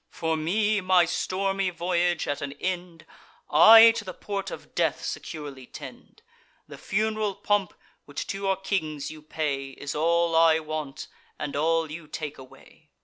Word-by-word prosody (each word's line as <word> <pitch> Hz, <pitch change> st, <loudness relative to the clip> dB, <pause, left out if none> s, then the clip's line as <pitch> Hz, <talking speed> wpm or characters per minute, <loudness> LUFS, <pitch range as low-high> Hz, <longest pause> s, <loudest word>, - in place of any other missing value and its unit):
For 160 Hz, 0 st, -2 dB
me, 205 Hz, +7 st, +1 dB
my 185 Hz, -1 st, +4 dB
stormy 195 Hz, +2 st, -1 dB
voyage 175 Hz, -1 st, 0 dB
at 145 Hz, -, -2 dB
an 140 Hz, 0 st, -4 dB
end, 175 Hz, 0 st, -5 dB, 0.5 s
I 225 Hz, +9 st, +9 dB
to 225 Hz, -2 st, -5 dB
the 185 Hz, -3 st, -8 dB
port 195 Hz, -1 st, -4 dB
of -, -, -10 dB
death -, -, 0 dB
securely 145 Hz, -5 st, -6 dB
tend. -, -, -12 dB, 0.4 s
The -, -, -11 dB
fun'ral 215 Hz, 0 st, -1 dB
pomp 200 Hz, -2 st, 0 dB, 0.3 s
which 145 Hz, -, -5 dB
to 195 Hz, -, -6 dB
your 195 Hz, -1 st, +1 dB
kings 160 Hz, -7 st, -3 dB
you 155 Hz, -1 st, -11 dB
pay, 140 Hz, -3 st, -3 dB
Is 140 Hz, +2 st, -6 dB
all 170 Hz, +2 st, +2 dB
I 165 Hz, -1 st, +6 dB
want, 155 Hz, -3 st, -5 dB, 0.3 s
and 145 Hz, -, -5 dB
all 160 Hz, +1 st, +1 dB
you 155 Hz, 0 st, -8 dB
take 150 Hz, -1 st, -6 dB
away." 130 Hz, -1 st, -17 dB
170 Hz, 155 wpm, -26 LUFS, 155-195 Hz, 0.5 s, I